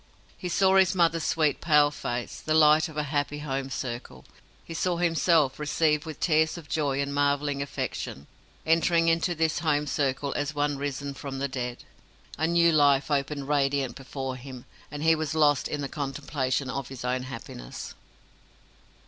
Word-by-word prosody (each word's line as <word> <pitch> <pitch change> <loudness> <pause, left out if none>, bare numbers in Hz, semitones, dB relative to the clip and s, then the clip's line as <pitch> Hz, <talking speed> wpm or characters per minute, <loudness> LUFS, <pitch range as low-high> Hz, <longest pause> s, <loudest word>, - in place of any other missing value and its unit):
He 180 - -5
saw 190 +2 +4
his 190 -1 +4
mother's 165 -2 +2
sweet 155 -3 +1
pale 150 -3 +4
face, 120 -4 -5
the 155 - 0
light 155 0 +5
of 155 - -11
a 150 - +1
happy 145 0 0
home 135 -2 -3
circle. 125 -2 -6 0.4
He 165 - -7
saw 175 +1 0
himself 165 -4 +2
received 150 0 +1
with 155 -2 -7
tears 160 0 +2
of 165 -3 -10
joy 140 -1 0
and 140 0 -4
marvelling 145 0 +1
affection 70 - -4 0.4
entering 165 +1 +3
into 165 +1 +1
this 160 0 +1
home 150 -3 +1
circle 140 -1 -1
as 145 +1 -2
one 145 -1 0
risen 140 0 -3
from 135 0 -6
the 140 +1 -1
dead. 125 -2 -5 0.6
A 160 - +2
new 170 0 +4
life 145 -2 +3
opened 140 0 -1
radiant 140 -2 +1
before 135 -1 -5
him, 130 -1 -10 0.2
and 145 +1 -6
he 160 0 +5
was 155 -1 -2
lost 145 -3 +3
in 150 - -3
the 140 - -2
contemplation 135 -1 -2
of 135 0 -4
his 130 -2 -8
own 125 +1 0
happiness. 115 - -8
145 Hz, 170 wpm, -27 LUFS, 135-160 Hz, 0.6 s, light